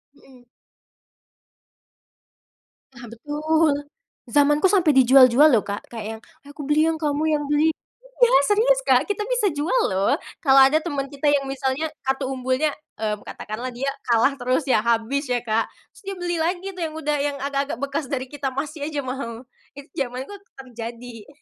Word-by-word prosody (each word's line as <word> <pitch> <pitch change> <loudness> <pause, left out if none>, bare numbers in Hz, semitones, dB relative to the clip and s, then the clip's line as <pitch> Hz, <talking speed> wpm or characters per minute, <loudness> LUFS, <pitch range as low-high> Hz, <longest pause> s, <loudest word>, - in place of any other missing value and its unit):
Mhm. 255 -3 -20 2.5
Nah 240 0 -11
betul. 300 +5 0 0.5
Zamanku 295 +7 +3
sampe 360 -6 +3
dijual-jual 260 +2 +7
loh 225 -4 +3
Kak. 200 0 -6
Kayak 225 -3 -6
yang, - - -31 0.3
"Aku 290 +1 -10
beli 305 +2 +3
yang 320 -1 -1
kamu 295 -1 -1
yang 295 - -2
beli." 300 +2 +3 0.5
Iya, 485 -1 +4 0.2
serius - - +3
Kak, - - +3
kita 415 0 -3
bisa - - +1
jual 305 +11 0 0.2
loh 200 +10 +2 0.2
kalau 275 -3 +4
ada 310 +4 +2
temen 285 -5 -3
kita 280 +1 -1
yang 280 -1 +2
misalnya 270 +2 -2 0.2
kartu 265 0 -1
umbulnya, 260 +3 -1 0.2
eee, 215 -1 -1
katakanlah 235 +4 -6
dia 270 +3 -3 0.2
kalah 235 +4 +4
terus 255 +4 0
ya, 250 -5 +3
habis 235 +5 0
ya 245 - +2
Kak, 220 0 0 0.2
terus - - -18
dia 390 -1 -6
beli 350 -1 -2
lagi 355 +3 -1
tuh 360 - -8
yang 315 -1 -3
udah 300 -1 -1
yang 285 -1 -2
agak-agak 275 -2 -2
bekas 280 +1 -3
dari 260 -2 -2
kita 275 0 -4
masih 290 +3 -4
aja 285 -3 -4
mau. 255 -2 -6 0.3
Itu 280 +1 -11
zamanku 260 +7 -4 0.2
terjadi. 235 -2 -9
275 Hz, 165 wpm, -23 LUFS, 255-310 Hz, 2.5 s, dijual-jual